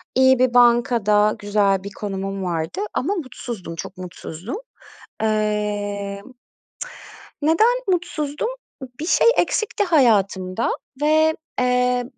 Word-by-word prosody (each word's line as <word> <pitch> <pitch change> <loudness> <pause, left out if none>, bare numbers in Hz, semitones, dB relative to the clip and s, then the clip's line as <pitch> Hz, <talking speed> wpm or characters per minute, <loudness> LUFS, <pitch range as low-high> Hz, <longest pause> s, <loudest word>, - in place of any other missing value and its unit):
İyi 260 -1 +5
bir 255 -1 +3
bankada 235 -4 +4
güzel 200 -2 +1
bir 200 - -7
konumum 195 -1 -4
vardı 165 - -3
ama 380 +10 -1
mutsuzdum, 240 - -6
çok 185 +3 -7
mutsuzdum. 180 - -7 0.7
Emm, 210 0 -2 1.1
neden 435 +11 +4
mutsuzdum? 335 -1 -1 0.4
I - - -7
bir 320 - -3
şey - - +3
eksikti 435 -1 +1
hayatımda 210 - +2 0.3
ve, 315 +1 +3 0.2
eee, 250 0 +2
225 Hz, 105 wpm, -21 LUFS, 200-280 Hz, 1.1 s, İyi